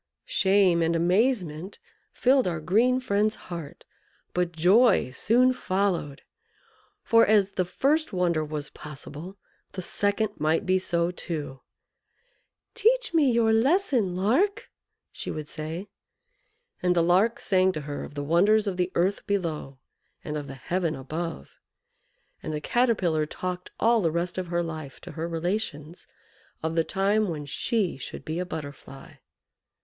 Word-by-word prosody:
Shame 190 -3 +3
and 165 +1 +1
amazement 180 - 0 0.3
filled 260 -3 +3
our 170 -3 -2
green 230 +10 +2
friend's 215 -3 +1
heart, 170 -5 -8 0.5
but 180 -1 0
joy 185 - +4
soon 245 - +3
followed; 185 - -1 0.8
for, 230 -1 +5
as 205 -2 +3
the 185 - -1
first 295 - +1
wonder 175 -4 +1
was 150 -1 -5
possible, 150 +5 -9 0.4
the 185 - -4
second 205 +3 0
might 160 +6 +1
be 185 0 +3
so 170 -1 0
too. 150 -7 -6 1.1
"Teach 460 -1 +2
me 295 -6 +4
your 230 -1 +3
lesson, 250 - +2
Lark!" 260 - +1 0.4
she - - -7
would 155 -1 -5
say; 160 +6 -5 0.9
and 180 0 +2
the 170 - +3
Lark 190 +7 +3
sang 190 -1 +3
to 155 - -4
her 145 0 -5
of - - -10
the 145 - -3
wonders 200 +8 +3
of 195 -3 -2
the 180 0 0
earth 185 +4 0
below 160 -9 -2 0.5
and 150 - -4
of 145 -2 -4
the 135 - -8
heaven 165 +4 -2
above. 155 - -6 0.8
And - - -5
the 150 - -2
Caterpillar 180 -6 +1
talked 180 +2 -5
all 230 0 +4
the 165 - +2
rest 170 +3 -2
of 185 - -4
her 175 0 0
life 155 -5 -7
to 180 - -9
her 165 +1 -4
relations 170 -2 -3 0.6
of 160 0 -1
the 165 0 +2
time 200 +4 +1
when 155 -4 -4
she 185 +6 -1
should - - -8
be 160 +2 -3
a 180 - -2
Butterfly. 140 -4 -9
180 Hz, 145 wpm, -26 LUFS, 160-210 Hz, 1.1 s, for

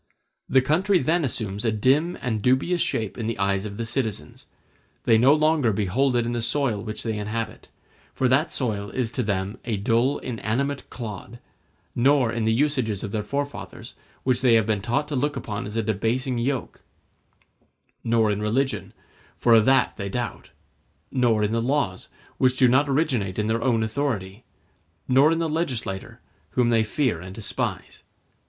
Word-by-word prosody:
The 130 -1 +4
country 180 +8 +2
then 170 0 +1
assumes 105 -6 -3
a 115 - +2
dim 135 +11 +2
and 110 -4 -2
dubious 130 - +2
shape 110 0 -2
in 110 - -2
the 115 - -2
eyes 100 0 0
of 100 -1 -6
the 115 - -3
citizens; 115 -3 -4 0.6
they 115 -1 +4
no 130 +4 +6
longer 155 -5 +3
behold 110 +7 +1
it 120 -1 +2
in 120 - -2
the 120 -1 -2
soil 120 -3 0
which 110 0 -6
they 110 -2 -2
inhabit, 110 +1 -4 0.5
for 130 - +2
that 140 +6 +2
soil 105 -6 -1
is 120 -1 -2
to 125 - -2
them 100 0 -2
a 115 -4 -2
dull 115 +6 +1
inanimate 130 +4 -3
clod; 115 0 -7 0.6
nor 130 -1 +3
in 115 -2 -2
the 110 - +3
usages 125 -5 0
of 100 - -4
their 110 - -1
forefathers, 140 +6 -5 0.3
which 130 -2 +1
they 125 -3 +5
have 110 -2 +3
been 105 -2 0
taught 135 +8 -1
to 145 - -2
look 145 +3 0
upon 105 0 -4
as 105 +2 -5
a 115 - +1
debasing 115 +4 -1
yoke; 130 +1 -2 1.2
nor 115 -2 +2
in 105 0 -2
religion, 130 +6 -1 0.4
for 120 - +4
of 110 -1 +6
that 135 0 +3
they 100 -2 -4
doubt; 120 +4 -4 0.6
nor 120 -5 +2
in 105 - 0
the 115 0 0
laws, 120 -7 -1 0.3
which 130 0 +3
do 130 - +5
not 135 +4 +3
originate 130 - 0
in 105 - 0
their 110 +1 0
own 115 -3 +2
authority; 110 -4 -3 0.6
nor 135 +5 +5
in 165 - +1
the 165 0 0
legislator, 125 - -3 0.3
whom 125 -2 +2
they 115 -2 +3
fear 110 - -1
and 95 +1 -9
despise. 110 - -4
120 Hz, 175 wpm, -24 LUFS, 110-135 Hz, 1.2 s, no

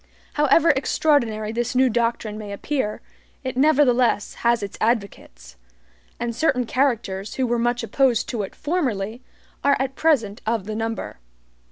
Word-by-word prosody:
However 300 +3 +4
extraordinary 255 -6 +1
this 240 +2 -2
new 260 +1 +5
doctrine 230 -2 -1
may 210 -1 -7
appear, 210 +1 -2 0.4
it 260 -1 -4
nevertheless 255 -6 +3
has 235 -2 +2
its 200 - -6
advocates; 125 - -2 0.6
and 235 -1 -3
certain 250 -2 +1
characters 225 -6 -1
who 260 - 0
were 240 -1 0
much 240 0 0
opposed 245 0 +2
to 235 -4 -2
it 195 - -6
formerly, 245 - -2 0.4
are 280 0 +4
at 265 0 -1
present 245 -10 +1
of 220 -3 -1
the 215 - -4
number. 225 - -4
235 Hz, 145 wpm, -23 LUFS, 215-265 Hz, 0.6 s, new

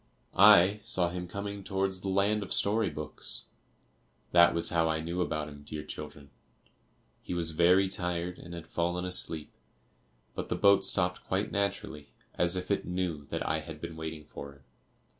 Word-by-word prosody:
I 100 0 +7
saw 90 -2 +3
him 90 0 -5
coming 100 +2 -5
towards 95 -1 -1
the 95 - -3
land 100 +2 +2
of 100 - -7
story 105 0 +2
books. 75 0 -4 0.9
That 85 -1 +6
was 85 - +2
how 80 -1 +2
I 80 0 0
knew 85 +3 -3
about 75 -2 -2
him, 70 -1 -11
dear 75 +1 -7
children. 75 -2 -9 0.9
He 90 - -5
was 85 -2 +2
very 90 +4 +4
tired 90 -1 -3
and 85 +1 -9
had 85 - -8
fallen 90 +1 -1
asleep, 80 -4 -2 0.8
but - - -5
the - - 0
boat 100 -1 +5
stopped 90 0 +1
quite 95 +2 -1
naturally, 100 -7 -3 0.2
as 90 +1 +1
if 90 +2 -3
it 100 - +1
knew 90 -5 -3
that - - -4
I 80 +1 +1
had 80 0 -9
been 80 - -7
waiting 80 -1 -6
for 70 -1 -9
him. 70 -1 -22
90 Hz, 175 wpm, -30 LUFS, 80-95 Hz, 0.9 s, I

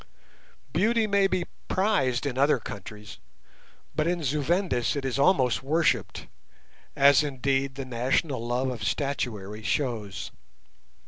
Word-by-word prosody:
Beauty 225 +6 +2
may 200 -2 +3
be 185 -2 -1 0.2
prized 150 - +1
in 135 -3 -2
other 140 +2 +3
countries, 105 -1 -9 0.7
but 155 - 0
in 175 -1 -1
Zu 145 +2 0
Vendis 170 - 0
it 140 -2 -3
is 135 +1 -1
almost 135 -6 +3
worshipped, 155 +5 0 0.7
as 140 +1 +6
indeed 135 -1 -1
the 135 0 -5
national 130 +2 0
love 125 +2 -1
of 120 -3 -6
statuary 110 -7 -2
shows. 110 -5 -2
135 Hz, 125 wpm, -27 LUFS, 120-160 Hz, 0.7 s, as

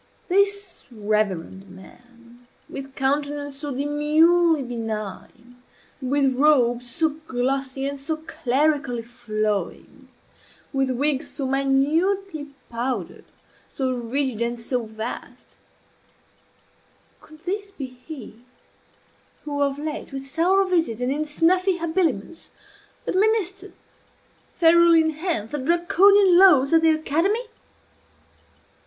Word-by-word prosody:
This 400 +1 +1
reverend 205 -4 -2
man, 240 +4 -17 0.2
with 270 -1 -9
countenance 285 +1 -1
so 290 +1 -6
demurely 300 +3 +3
benign, 230 0 -6 0.4
with 270 0 +1
robes 245 -4 +3
so 320 +5 +1 0.2
glossy 265 +1 -2
and 280 0 -5
so 310 +3 -3
clerically 275 -4 -1
flowing, 215 -3 -4 0.7
with 270 -1 +1
wig 270 +2 +1
so 280 -3 -6
minutely 295 +6 0 0.2
powdered, 235 -5 -4 0.4
so 260 -2 -2
rigid 245 0 -2
and 235 0 -1
so 235 0 -2
vast, 220 +2 -8 1.7
could 310 0 -17
this 400 +2 -3
be 345 -9 -7
he 255 -2 -11 1.0
who, 290 -1 -3
of 280 -1 +1
late, 300 0 -5
with 270 0 -6
sour 360 +8 +2
visage, 325 - 0
and 250 +1 0
in 300 +2 -1
snuffy 360 +5 +2
habiliments, 330 - -2 0.6
administered, 395 -1 0 0.8
ferule 340 0 +6
in 320 -1 +4
hand, 310 - -3
the 295 - -3
Draconian 360 +5 +4
Laws 300 -7 +6
of 325 - +6
the 325 - +4
academy? 330 - +1
280 Hz, 105 wpm, -23 LUFS, 245-330 Hz, 1.7 s, ferule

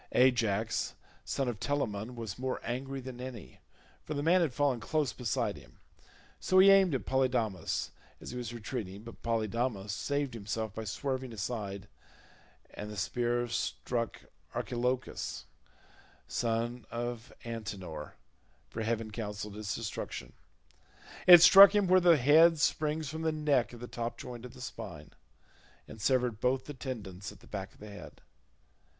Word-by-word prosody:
Ajax 115 -4 +2 0.3
son 135 - -2
of 120 -4 -3
Telamon 125 -5 -2
was 115 -2 -6
more 130 0 -2
angry 135 +3 -3
than 125 -1 -8
any, 125 -4 -8 0.4
for 155 - -5
the 145 - -2
man 175 +3 +5
had 160 -5 +1
fallen 135 -1 +1
close 145 +5 0
beside 120 -5 -1
him; - - -16 0.6
so 185 - +2
he 195 +1 +9
aimed 190 -6 +5
at 130 - -3
Polydamas 125 -7 0 0.3
as - - -8
he 125 - -6
was 120 -2 -5
retreating, 110 -4 -5
but 115 - -11
Polydamas 115 -2 -1
saved 140 +4 -1
himself 110 -1 -4
by 110 0 -5
swerving 130 +5 -3
aside 105 -2 -4 0.9
and 105 - -6
the 105 - -7
spear 120 +2 0
struck 120 0 -2 0.3
Archelochus 125 +1 -2 0.8
son 115 +1 -1
of 120 +1 -4
Antenor, 105 -9 -6 0.6
for 115 - -4
heaven 110 0 -1
counselled 105 -1 -5
his 105 0 -4
destruction; 115 -2 -5 0.9
it 175 -2 +11
struck 195 +2 +10
him 205 -1 +4
where 185 0 +6
the 170 -2 +6
head 155 +5 +6
springs 155 +1 +1
from 160 +3 -5
the 160 0 +1
neck 150 -5 +1
at 120 - -10
the 120 - -6
top 120 -1 -4
joint 125 -1 -8
of 125 - -10
the 125 - -11
spine, 85 -10 -8 0.8
and 110 - -10
severed 125 -2 +1
both 130 +1 +1
the 145 - -7
tendons 105 -8 -6
at - - -15
the - - -16
back 95 -2 -6
of - - -23
the 105 0 -10
head. 100 - -11
120 Hz, 155 wpm, -31 LUFS, 110-135 Hz, 0.9 s, it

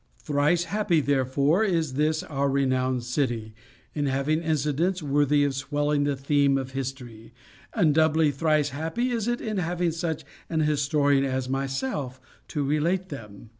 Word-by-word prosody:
Thrice 145 +8 +1
happy, 200 -3 +1
therefore, 140 - +2
is 165 -9 0
this 155 +3 +1
our 140 -1 -1
renowned 130 -2 +1
city, 120 -3 -2 0.4
in 145 -2 -1
having 140 +4 0
incidents 160 +3 0
worthy 145 0 +2
of 140 -1 +1
swelling 145 +1 0
the 145 -1 0
theme 140 0 +2
of 130 -1 -4
history; 125 -4 -7 0.4
and 155 -4 +3
doubly 160 0 +3
thrice 150 +1 +1
happy 165 - -2
is 230 -2 -1
it 240 0 -1
in 215 -3 -3
having 175 -1 0
such 165 0 -3 0.2
an 160 -1 0
historian 145 -2 +2
as 130 -1 -1
myself 135 -1 -3 0.3
to 145 - -2
relate 170 +6 0
them. 110 -6 -10
145 Hz, 150 wpm, -26 LUFS, 135-160 Hz, 0.4 s, and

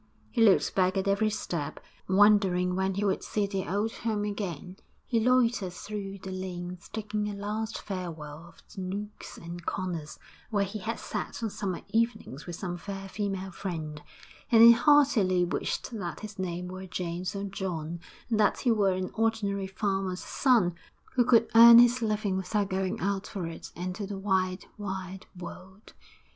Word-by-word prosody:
He 235 - 0
looked 210 -4 +5
back 185 0 +2
at 190 +1 0
every 200 +2 +2
step, 165 -7 -4 0.3
wondering 190 -2 +4
when 190 0 0
he 205 +1 0
would 195 - +1
see 210 -1 0
the 195 -1 -3
old 205 +3 0
home 220 -3 -1
again. 190 -3 -4 0.3
He 230 - +1
loitered 235 -6 +2
through 200 +1 -6
the 190 - -5
lanes, 180 -1 -6
taking 210 -1 -2
a 205 - -5
last 215 +2 -3
farewell 165 -5 -6
of - - -19
the 190 - -6
nooks 200 +3 -6
and 170 +1 -8
corners 170 -5 -4 0.3
where 205 -3 +1
he 200 +2 -4
had 225 +3 -3
sat - - -5
on 220 - -1
summer 190 -4 -3
evenings 225 - -1
with 175 - -5
some 175 0 -4
fair 195 +2 -6
female 195 -1 -3
friend, 160 -5 -5 0.5
and 225 -1 +8
he 235 - +11
heartily 235 - +4
wished 175 - -2
that 185 -8 -5
his 210 -2 -8
name 180 -1 -3
were 185 +1 -7
James 180 +1 -3
or 200 - -3
John, 175 -4 -4 0.3
and 225 -3 0
that 210 - +3
he 245 - +3
were 200 -4 +3
an 185 0 -3
ordinary 205 -3 0
farmer's 190 -1 -2
son 235 -10 +3 0.4
who 250 - +4
could 230 -1 +5
earn 230 +1 +10
his 240 +1 +6
living 210 -3 0
without 195 +1 -1
going 190 0 -1
out 200 +1 -1
for 190 -4 -4
it 165 0 -8
into 185 +4 -4
the 200 -1 -5
wide, 190 -1 0
wide 190 -2 -5
world. 190 +3 -10
195 Hz, 170 wpm, -29 LUFS, 180-215 Hz, 0.5 s, he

